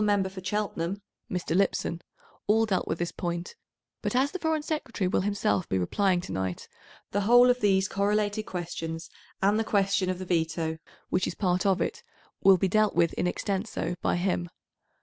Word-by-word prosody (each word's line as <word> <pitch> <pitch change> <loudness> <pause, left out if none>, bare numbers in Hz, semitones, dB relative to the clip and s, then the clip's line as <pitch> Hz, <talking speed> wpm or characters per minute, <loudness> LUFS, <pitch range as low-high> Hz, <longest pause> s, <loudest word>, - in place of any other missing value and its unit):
Member 205 -2 +2
for 190 -1 -9
Cheltenham 195 -2 -2 0.3
(Mr. 175 -2 -2
Lipson) 180 -3 +1 0.5
all 220 +2 +4
dealt 195 -4 0
with - - -1
this 175 0 -2
point, 175 -1 -4 0.5
but - - -2
as 270 +3 +3
the 375 - -5
Foreign 320 -2 0
Secretary 265 - -2
will 180 - +1
himself 205 -1 0
be 95 - +1
replying 180 - +1
to 180 - -8
night, 95 -1 -3 0.4
the 205 - +1
whole 245 +4 +7
of 250 - -1
these 190 -2 +3
correlated 205 +1 0
questions 165 -2 -5 0.3
and 205 +2 +4
the - - +2
question 195 -3 +1
of 185 - -1
the 185 - -6
veto, 160 -2 -1 0.3
which 180 - +1
is - - -4
part 185 -1 +1
of 190 -2 +2
it, 465 +2 -2 0.4
will 195 -1 +7
be 190 - +1
dealt 215 +2 +2
with 170 - +3
in - - 0
extenso 190 -2 -2
by - - +1
him. 175 -1 -1
190 Hz, 185 wpm, -28 LUFS, 175-210 Hz, 0.5 s, whole